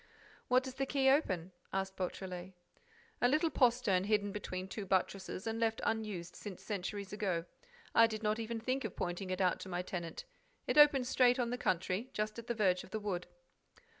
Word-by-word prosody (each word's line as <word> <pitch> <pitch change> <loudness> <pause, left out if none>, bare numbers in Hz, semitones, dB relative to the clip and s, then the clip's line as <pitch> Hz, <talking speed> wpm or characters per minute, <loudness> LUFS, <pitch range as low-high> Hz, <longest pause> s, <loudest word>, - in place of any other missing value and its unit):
"What 255 +1 +4
does 260 -1 -6
the 270 +1 -2
key 270 -1 +4
open?" 185 - +1 0.2
asked 190 0 -2
Beautrelet. 185 0 -5 0.7
"A 245 - +6
little 310 +5 +2
postern 235 -7 +3
hidden 205 -1 +1
between 185 -2 -4
two 205 +2 -5
buttresses 190 0 -1
and 225 0 -2
left 225 -1 +1
unused 210 -6 -2
since 200 -4 -8
centuries 200 -1 -4
ago. 185 -5 -1 0.5
I 230 - +7
did 220 -1 -5
not 215 +1 +1
even 230 0 -3
think 255 +4 -1
of 220 - -4
pointing 175 +2 -3
it 185 +1 -1
out 180 -2 +2
to 190 - -7
my 180 0 -2
tenant. 180 - -5 0.4
It - - +3
opens 285 -4 +7
straight 250 -1 +4
on 240 -2 0
the - - 0
country, 185 +6 0
just 215 +1 -2
at 235 - -10
the 235 - -1
verge 185 -4 +2
of - - -13
the 220 - -3
wood." 195 -4 -3
210 Hz, 195 wpm, -34 LUFS, 185-240 Hz, 0.7 s, I